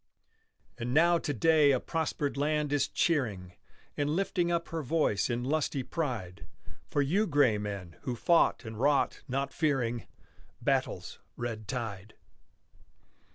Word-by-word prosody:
And 120 Hz, +2 st, -2 dB
now 170 Hz, +2 st, +5 dB
to 145 Hz, -, -2 dB
day 150 Hz, +3 st, +4 dB
a 130 Hz, -2 st, +3 dB
prospered 155 Hz, -2 st, -2 dB
land 150 Hz, +1 st, 0 dB
is 145 Hz, -, +2 dB
cheering 110 Hz, -, 0 dB, 0.4 s
And 145 Hz, 0 st, 0 dB
lifting 175 Hz, +1 st, 0 dB
up 170 Hz, 0 st, -1 dB
her 165 Hz, -1 st, -3 dB
voice 140 Hz, -8 st, +1 dB
in 120 Hz, 0 st, -1 dB
lusty 145 Hz, -1 st, 0 dB
pride 110 Hz, -, -4 dB, 0.4 s
For 145 Hz, -, +2 dB
you 195 Hz, +10 st, +1 dB
gray 145 Hz, -, +3 dB
men, 100 Hz, -5 st, -6 dB
who 125 Hz, -, -3 dB
fought 165 Hz, +1 st, +3 dB
and 110 Hz, -1 st, -7 dB
wrought, 140 Hz, +2 st, +2 dB
not 135 Hz, +2 st, -2 dB
fearing 125 Hz, -7 st, 0 dB, 0.5 s
Battle's -, -, -1 dB, 0.2 s
red 115 Hz, -3 st, -4 dB
tide. 110 Hz, -5 st, -5 dB
140 Hz, 135 wpm, -30 LUFS, 115-155 Hz, 0.5 s, now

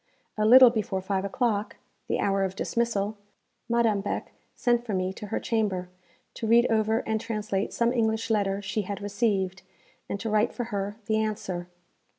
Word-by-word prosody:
A 215 Hz, 0 st, +1 dB
little 255 Hz, +1 st, +9 dB
before 210 Hz, -4 st, -1 dB
five 190 Hz, 0 st, -2 dB
o'clock, 210 Hz, 0 st, -1 dB, 0.3 s
the -, -, 0 dB
hour 195 Hz, 0 st, +1 dB
of 190 Hz, 0 st, -2 dB
dismissal, 215 Hz, -2 st, -1 dB, 0.5 s
Madame 230 Hz, -4 st, +2 dB
Beck 205 Hz, -, -4 dB, 0.2 s
sent 240 Hz, -1 st, +1 dB
for 220 Hz, -5 st, -3 dB
me 185 Hz, 0 st, -1 dB
to 210 Hz, -, -8 dB
her 215 Hz, -, -2 dB
chamber, 200 Hz, -6 st, -1 dB, 0.4 s
to 225 Hz, -, -4 dB
read 235 Hz, +2 st, +6 dB
over 220 Hz, +1 st, +2 dB
and 220 Hz, -1 st, -1 dB
translate 210 Hz, -3 st, -2 dB
some 235 Hz, +1 st, +1 dB
English 225 Hz, -1 st, 0 dB
letter 200 Hz, -2 st, 0 dB
she 205 Hz, +2 st, -1 dB
had 200 Hz, 0 st, -5 dB
received, 200 Hz, -2 st, -1 dB, 0.5 s
and 200 Hz, -, -3 dB
to 225 Hz, -, -4 dB
write 215 Hz, +2 st, +2 dB
for 245 Hz, -, -3 dB
her 200 Hz, +1 st, -2 dB
the 220 Hz, +1 st, +1 dB
answer. 195 Hz, -5 st, -2 dB
215 Hz, 170 wpm, -27 LUFS, 195-225 Hz, 0.5 s, little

